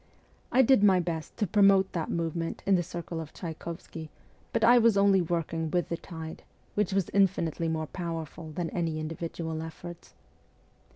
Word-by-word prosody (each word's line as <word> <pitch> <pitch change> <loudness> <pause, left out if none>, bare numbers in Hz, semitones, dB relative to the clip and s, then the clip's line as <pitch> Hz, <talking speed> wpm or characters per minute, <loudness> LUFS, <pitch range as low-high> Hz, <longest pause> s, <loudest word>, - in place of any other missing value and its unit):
I 260 +2 +6
did 260 -4 +5
my 190 -3 +6
best 165 -3 -4
to 220 - +1
promote 195 -1 +4
that 165 -3 -3
movement 165 0 -2
in 195 - +3
the 180 - +4
circle 170 -1 -5
of 160 -1 -9
Tchaykovsky; 165 -1 -7 0.4
but - - 0
I 240 +2 +7
was 230 -3 +4
only 200 -1 +5
working 165 -1 -2
with 175 +1 0
the 170 - 0
tide, 160 -2 -8 0.3
which 210 -2 0
was 195 -2 0
infinitely 175 -4 +2
more 160 -1 -1
powerful 165 -1 -5
than 165 +1 -3
any 165 -3 -1
individual 160 0 -4
efforts. 170 +2 -9
170 Hz, 165 wpm, -29 LUFS, 160-195 Hz, 0.4 s, I